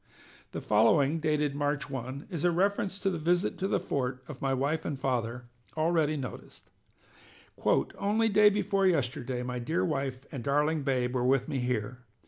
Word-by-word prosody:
The - - -5
following, 135 +9 +3
dated 150 -2 +1
March 145 0 -1
1, 130 +1 -6
is 165 -4 -3
a 175 - +4
reference 195 +2 0
to 195 - +1
the 170 - -3
visit 175 +4 +1
to 190 - 0
the - - +1
fort 130 -1 -3
of 150 -3 -9
my 135 - 0
wife 140 +5 0
and 140 -3 -4
father 120 -2 -2 0.3
already 155 -1 +2
noticed: 130 -5 -8 0.9
"Only 215 +3 +1
day 210 0 +6
before 200 -1 +1
yesterday 125 -6 -1
my 125 0 -3
dear 165 +9 0
wife 135 -4 -2
and 130 -4 -5
darling 150 +3 +1
babe 130 -3 0
were 125 -1 0
with 130 +1 +2
me 140 -4 -2
here. 125 0 -2
145 Hz, 170 wpm, -29 LUFS, 125-170 Hz, 0.9 s, day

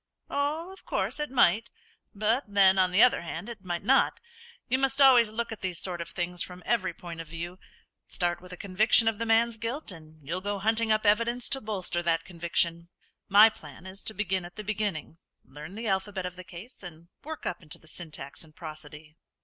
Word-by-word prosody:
"Oh, 300 +5 -1
of 385 - -15
course - - -2
it 300 - -2
might; 230 -3 +3 0.4
but 215 +6 0
then, 195 -2 +6
on 185 -1 +4
the 185 +5 +6
other 250 - +5
hand, 170 +3 -6
it 220 -4 -9
mightn't. 195 +9 +2 0.5
You 260 - +1
must 270 0 +1
always 250 -5 +7
look 230 +2 -3
at 220 - -7
these 185 -2 -3
sort 175 -2 -4
of 170 - -6
things 175 -1 -4
from 180 0 -7
every 210 -5 +1
point 170 -1 -8
of 165 - -11
view. 170 +3 -7 0.5
Start 175 -1 -1
with 180 0 -13
a 180 - -8
conviction 215 +5 +4
of 225 -2 +1
the 230 - -2
man's 225 +1 +3
guilt, 230 +3 -3
and 155 -4 -14
you'll 180 +4 -2
go 205 +1 -2
hunting 220 +2 +1
up 215 0 +2
evidence 230 +4 +2
to 270 - +2
bolster 190 -5 -2
that 165 -1 0
conviction. 170 -1 0 0.4
My 205 +2 +9
plan 155 -6 -9
is 190 +1 -6
to 220 - -1
begin 190 -3 -1
at 175 +1 -11
the 215 - -6
beginning; 205 -6 -3 0.3
learn 150 +7 -10
the 225 +1 -5
alphabet 190 -1 -1
of 180 0 -5
the 185 - -9
case, 185 +7 -12
and 170 -2 -11
work 315 +1 -7
up 175 - -3
into 150 -3 -9
the 160 - -19
syntax 155 -4 -6
and 155 -1 -16
prosody." 155 -1 -9
190 Hz, 205 wpm, -28 LUFS, 170-225 Hz, 0.5 s, My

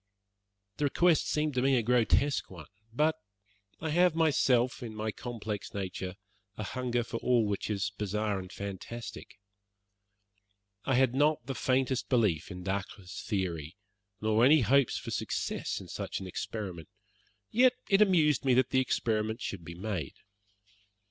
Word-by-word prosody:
The 150 - +1
request 170 +3 +3
seemed 150 -1 0
to 125 - +1
me 135 +1 +3
a 120 - +1
grotesque 125 +4 +2
one; 85 -5 -10 0.3
but 155 +6 +2 0.6
I 160 -1 -3
have 175 +1 +4
myself, 130 -6 +2
in 115 -3 -6
my 110 0 -2
complex 110 -4 -6
nature, 95 -1 -4 0.4
a 105 - -3
hunger 120 +2 -1
after 115 0 -4
all 120 -2 +2
which 105 0 -2
is 100 -1 -1
bizarre 105 0 -1
and 95 -1 -9
fantastic. 100 +3 -7 1.5
I 135 - +2
had 130 -1 +3
not 145 -1 +2
the 135 - -3
faintest 130 0 0
belief 105 - +2
in 90 -2 -7
Dacre's 95 -1 -4
theory, 90 -4 -2 0.4
nor 110 +2 +2
any 145 +3 +7
hopes 130 +3 +3
for - - -6
success - - -2
in - - -10
such - - -4
an 95 - -7
experiment; 95 -3 -5 0.6
yet 250 +2 +5
it 195 +1 +4
amused 160 -9 +4
me 130 -2 +4
that 130 0 +3
the 130 - +4
experiment 110 -2 0
should 100 -7 -5
be 85 +1 -8
made. 90 -6 -4
115 Hz, 150 wpm, -30 LUFS, 100-135 Hz, 1.5 s, any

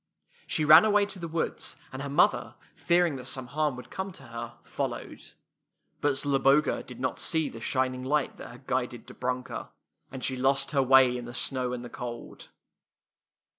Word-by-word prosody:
She 155 - 0
ran 155 +3 +10
away 210 -1 +4
to 200 -2 -7
the 170 - -4
woods, 165 0 -2 0.2
and 130 - -5
her 140 - -4
mother, 140 - +2 0.2
fearing 170 -4 +2
that 125 - -9
some 130 -1 -3
harm 150 +1 -1
would 125 -1 -11
come 190 +1 -4
to 140 - -12
her, 120 -1 -8
followed. - - -4
^ - - -15 0.7
But 145 -1 +2
Zloboga 140 +1 +3
did 125 - -11
not 130 - -2
see 160 -2 +1
the 115 - -10
shining 130 +1 -1
light 145 +2 0
that - - -9
had - - -14
guided - - -2
Dobrunka, 125 0 -4 0.4
and 130 -2 -7
she 130 - 0
lost 135 +3 +1
her 140 -2 +3
way 130 -1 +6
in 120 -1 -5
the 120 +1 -8
snow 130 -2 -1
and 125 -1 -5
the - - -5
cold. 120 -1 -8
135 Hz, 185 wpm, -28 LUFS, 125-150 Hz, 0.7 s, ran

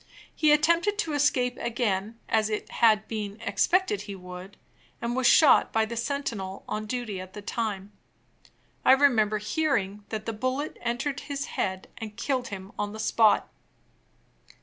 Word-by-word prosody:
He 310 -1 +3
attempted 335 +7 +3
to 330 -8 -1
escape 260 -4 +1
again, 225 -2 -1
as 220 -1 +2
it 215 - -4
had 215 -2 +3
been 210 -1 -5
expected 225 - +1
he 205 -1 -7
would, 180 +1 -10 0.4
and 235 +1 -2
was 260 -1 +3
shot 295 +1 +6
by 220 0 +2
the 235 +2 -6
sentinel 230 -6 -3
on 215 0 -3
duty 220 -5 -3
at 185 0 -11
the 210 - -8
time. 205 -3 -3 0.9
I - - +7
remember 235 -7 +3
hearing 210 -4 -1
that 215 0 -4
the 225 - -3
bullet 255 +6 -3
entered 245 +4 -2
his 280 -1 -4
head 190 -1 -2
and 215 -1 -7
killed 255 +1 -1
him 195 -1 -8
on 205 0 -2
the 220 - -8
spot. 220 0 +3
225 Hz, 155 wpm, -27 LUFS, 205-265 Hz, 0.9 s, I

